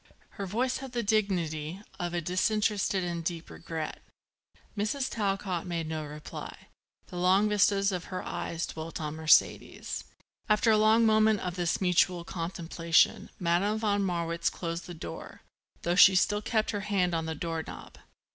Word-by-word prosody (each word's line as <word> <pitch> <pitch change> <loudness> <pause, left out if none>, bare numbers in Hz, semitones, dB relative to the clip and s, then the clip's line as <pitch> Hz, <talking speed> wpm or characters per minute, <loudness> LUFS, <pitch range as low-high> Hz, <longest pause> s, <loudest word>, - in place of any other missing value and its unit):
Her 195 - -6
voice 250 +7 0
had 265 -2 -8
the 240 -1 -1
dignity 180 -6 0 0.2
of 175 0 -3
a 175 - 0
disinterested 200 +2 +1
and 170 -1 -3
deep 165 0 -4
regret. 160 -2 -6 0.7
Mrs. 220 +6 -1
Talcott 195 -4 -2
made 170 -2 -2
no 155 -1 -3
reply. 150 0 -9 0.4
The 180 - -7
long 185 +4 +4
vistas 200 -1 +3
of 180 -2 -4
her 185 -1 -5
eyes 170 -1 -3
dwelt 160 +1 -7
on 150 -1 -3
Mercedes. 160 -1 +2 0.4
After 210 +2 +4
another 215 +1 +5
moment 215 -1 +4
of 180 -1 -3
this 175 -1 0
mutual 180 -1 +2
contemplation 165 -1 0
Madame 180 +5 +1
von 205 -2 +1
Marwitz 170 -3 -1
closed 170 0 -5
the 175 - -7
door, 160 - -8 0.4
though 170 - +1
she 190 +1 +8
still 205 +3 +2
kept 220 0 0
her 205 - -2
hand 195 -3 0
on 165 -1 -1
the 160 - -3
door 165 +1 -3
knob. - - -10
180 Hz, 155 wpm, -29 LUFS, 170-210 Hz, 0.7 s, she